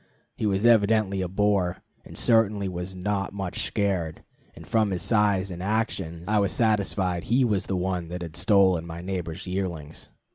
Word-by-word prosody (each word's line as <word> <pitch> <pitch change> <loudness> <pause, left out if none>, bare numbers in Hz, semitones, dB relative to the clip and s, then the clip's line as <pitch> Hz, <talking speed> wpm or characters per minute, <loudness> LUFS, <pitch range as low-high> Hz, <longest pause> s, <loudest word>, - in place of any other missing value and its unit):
He 110 - -1
was 100 +2 0
evidently 110 -4 +4
a 90 - -1
boar, 95 -1 0 0.2
and - - -12
certainly 105 -4 +2
was 90 +1 -5
not 100 +1 -2
much 95 -1 -3
scared, 95 -6 -1 0.3
and - - -11
from 110 -2 +2
his 90 -2 -2
size 100 -4 +2
and 90 0 -6
actions 95 -5 -2
I 105 0 +2
was 100 - +1
satisfied 100 -5 +1
he 125 +3 +3
was 105 -5 0
the 95 - -1
one 90 -2 -2
that 90 +1 -5
had 80 -3 -8
stolen 95 -2 +3
my 85 0 -7
neighbor's 90 -2 -4
yearlings. 90 -5 -5
95 Hz, 175 wpm, -26 LUFS, 90-105 Hz, 0.3 s, evidently